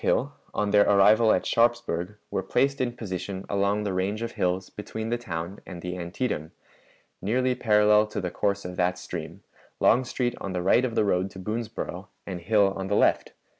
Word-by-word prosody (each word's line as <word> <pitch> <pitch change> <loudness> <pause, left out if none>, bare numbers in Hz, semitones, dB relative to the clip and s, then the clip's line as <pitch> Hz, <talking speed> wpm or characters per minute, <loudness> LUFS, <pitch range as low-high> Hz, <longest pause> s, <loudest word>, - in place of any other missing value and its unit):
Hill, - - +1 0.2
on 105 -1 -1
their 105 0 +5
arrival 105 +3 +6
at - - +1
Sharpsburg, 115 -6 +1 0.2
were - - 0
placed 135 +9 +1
in 120 -1 -2
position 95 -2 -5
along 100 +1 +1
the 100 -2 -2
range 100 +4 -1
of 115 - -3
hills 90 +1 -1
between 110 +1 -5
the 120 - 0
town 85 -3 -5
and 90 -2 -9
the 90 0 -4
Antietam, 85 -2 -3 0.7
nearly 125 +6 +1
parallel 105 -2 +4
to 105 - -4
the 90 -3 -3
course 100 -1 -1
of 90 0 -6
that 90 0 +1
stream, - - -7 0.4
Longstreet 125 0 +2
on 95 - -4
the 90 -1 -2
right 120 +7 +4
of 115 -3 -3
the 105 - +3
road 95 -1 +1
to 95 - -11
Boonsboro 110 +3 -4 0.2
and 90 -3 -5
Hill 100 +1 +3
on 95 0 -4
the 100 - 0
left. - - +2
100 Hz, 190 wpm, -26 LUFS, 95-110 Hz, 0.7 s, arrival